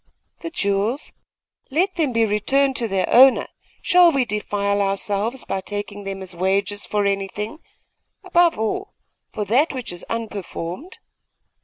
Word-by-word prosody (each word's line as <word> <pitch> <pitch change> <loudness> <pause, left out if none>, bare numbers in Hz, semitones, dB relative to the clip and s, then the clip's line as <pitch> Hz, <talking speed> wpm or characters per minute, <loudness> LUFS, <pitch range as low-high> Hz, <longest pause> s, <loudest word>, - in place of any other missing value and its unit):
'The 335 - -5
jewels? 205 0 -1 0.6
Let 360 +8 +1
them 315 -6 0
be 230 -1 +2
returned 265 +6 +1
to 235 - 0
their 195 -2 0
owner. 260 +2 +6 0.4
Shall 355 -2 +6
we 270 -4 +1
defile 205 -2 -1
ourselves 200 +5 -1
by 195 - -2
taking 205 0 -6
them 195 -1 -5
as 185 -1 -8
wages 200 +3 0
for 205 -1 0
anything 200 +6 -2 0.6
above 350 -2 +3
all, 380 - -3 0.4
for 210 - -3
that 265 +10 +2
which 255 -8 -5
is 175 - -9
unperformed? 215 - -5
210 Hz, 140 wpm, -22 LUFS, 200-270 Hz, 0.6 s, owner